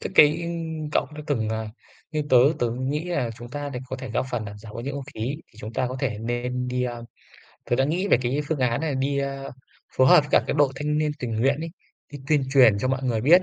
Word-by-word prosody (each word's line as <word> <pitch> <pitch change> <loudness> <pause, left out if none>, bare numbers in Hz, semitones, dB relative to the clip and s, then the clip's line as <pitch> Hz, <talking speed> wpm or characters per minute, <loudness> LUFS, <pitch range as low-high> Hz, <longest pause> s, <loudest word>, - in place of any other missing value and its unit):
Tức - - -5
cái, 150 +3 +6
ừm, 165 -2 -4
cậu - - +2
đã 150 - -6
từng, 115 -7 0
ờ 110 0 -2 0.4
như 155 -1 0
tớ 130 - +7 0.2
tớ 120 - +1
cũng 125 +3 -2
nghĩ 150 +3 -1
là 145 -10 -1
chúng 120 +1 -9
ta 145 +2 -4
để 125 -3 -5
có 130 - -5
thể 130 -3 -7
góp 125 +2 -1
phần 120 -3 -2
làm 105 0 -8
giảm 105 0 -11
ô - - -5
nhiễm 135 +3 -4
không 140 -1 -5
khí - - -8 0.3
thì 110 - -20
chúng 110 +1 -7
ta 125 - 0
có 130 - -5
thể 115 -7 -1
nên 120 +2 -2
đi, 125 0 -1
a 120 -1 -4 0.7
tớ 120 - +3
đã 135 - +3
nghĩ 180 +7 0
về - - +5
cái 130 +4 0
phương 160 -3 0
án 125 0 +1
nà 155 -3 -1
đi, 140 +1 0
a, 135 0 -3 0.5
phối 130 - +5
hợp 145 +2 +7
các - - +4
cái - - -1
đội 145 - +6
thanh 150 +1 0
niên 155 -1 +1
tình 125 - -4
nguyện 140 +4 +2
ấy, 165 0 -4 0.4
đi 145 - -6
tuyên 150 -3 +3
truyền 125 -7 +6
cho 130 - 0
mọi 135 0 0
người 115 -4 +1
biết 170 +9 +6
130 Hz, 275 wpm, -25 LUFS, 120-150 Hz, 0.7 s, tớ